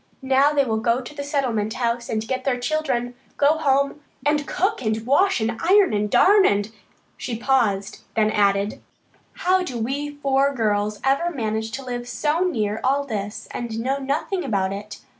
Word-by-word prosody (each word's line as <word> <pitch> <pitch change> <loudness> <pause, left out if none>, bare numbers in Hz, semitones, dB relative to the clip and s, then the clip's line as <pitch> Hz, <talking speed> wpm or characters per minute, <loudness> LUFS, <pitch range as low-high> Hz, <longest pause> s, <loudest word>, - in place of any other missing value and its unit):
Now 270 +2 +4
they 285 -2 +2
will 220 -3 0
go 235 +1 +1
to 255 +2 -9
the 285 -1 -5
Settlement 245 -7 -1
House 235 -1 -1
and 220 0 -2
get 260 +1 -2
their 255 -2 0
children, 245 -3 -1 0.2
go 295 +2 +3
home 280 0 +1 0.2
and 295 -1 +1
cook 385 -4 0
and 220 -1 -2
wash 370 +7 +3
and 225 +1 -2
iron 380 - +5
and 210 0 0
darn 400 - +5
and 205 - +1 0.2
" - - -38
she 235 -3 -4
paused, 230 -6 0 0.2
then 215 -1 +2
added, 200 0 +1 0.6
"How 370 +1 +4
did 250 -10 -3
we 285 +4 -3
four 280 -1 +1
girls 210 -2 0
ever 275 +6 +2
manage 220 -7 -2
to 270 - -5
live 245 -1 -5
so 300 +5 0
near 220 - 0
all 275 +2 +2
this 210 -5 -5
and 230 -2 -4
know 265 +4 -1
nothing 290 +7 -2
about 195 -2 0
it? 205 +1 -8
255 Hz, 180 wpm, -23 LUFS, 220-285 Hz, 0.6 s, iron